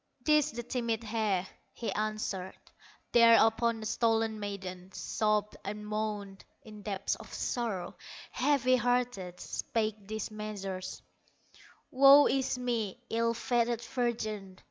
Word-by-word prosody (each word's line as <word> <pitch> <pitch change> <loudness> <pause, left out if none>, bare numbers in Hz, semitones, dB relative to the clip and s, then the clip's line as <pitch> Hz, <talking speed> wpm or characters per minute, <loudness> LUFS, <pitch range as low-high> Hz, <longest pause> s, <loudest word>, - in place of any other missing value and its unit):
"'Tis 300 0 +4
the 240 +1 -5
timid 235 -2 -2
hare", 215 -4 0 0.3
he 235 - -4
answered. 210 -3 -3 0.5
Thereupon 230 0 +5
the - - -5
stolen 225 -1 +1
maiden 190 -2 -6
Sobbed, 210 -1 0
and 210 +1 -5
moaned, 210 -2 -3 0.2
in 210 -1 -11
deeps 200 -1 -2
of - - -12
sorrow, 225 -7 -2 0.4
Heavy 255 -3 +3
hearted, 245 -8 -1
spake 215 -5 -3
these 220 0 -4
measures: 200 -3 -5 0.9
"Woe 275 +2 +8
is 265 -1 +1
me, 235 -5 -2
ill 230 +1 +1
fated 235 0 0
virgin! 220 -5 -3
220 Hz, 115 wpm, -31 LUFS, 205-235 Hz, 0.9 s, Woe